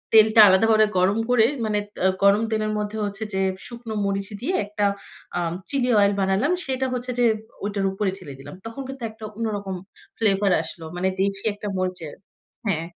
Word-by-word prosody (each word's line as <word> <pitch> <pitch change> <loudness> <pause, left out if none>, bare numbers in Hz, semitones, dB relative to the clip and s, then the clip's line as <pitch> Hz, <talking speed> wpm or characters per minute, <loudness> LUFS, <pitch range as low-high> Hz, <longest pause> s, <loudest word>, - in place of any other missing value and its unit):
তেলটা 220 0 +8
আলাদাভাবে 215 +3 +5
গরম 190 +4 +3
করে 240 -3 +5 0.2
মানে, 210 -1 +1 0.2
তা - - -8 0.2
গরম 200 +2 +5
তেলের 215 -1 0
মধ্যে 210 +1 -3
হচ্ছে 200 +2 -4
যে 190 - +1 0.3
শুকনো 235 -2 -7
মরিচ 195 0 -1
দিয়ে 350 +10 0
একটা 205 0 -1 0.5
আএম 170 -1 -1 0.2
চিলি 255 -3 +1
অয়েল 200 0 +4
বানালাম। 195 - +2
সেটা 265 -1 -1
হচ্ছে 250 0 -3
যে 245 - +4 0.4
ওইটার 200 -1 -1
উপরে 195 +1 -1
ঢেলে 165 -7 -9
দিলাম। 135 - -10
তখন 230 +4 -6
কিন্তু 270 -2 -8
একটা 220 0 -10
অন্যরকম 205 -4 -3
একটা 195 - -26
ফ্লেভার 200 -2 +3
আসলো। 160 0 -8
মানে 185 +1 +1
দেশি 195 0 -1
একটা 205 0 -7
মরিচের 180 -5 -3 0.5
হ্যাঁ। 165 -4 0
205 Hz, 175 wpm, -24 LUFS, 195-225 Hz, 0.5 s, তেলটা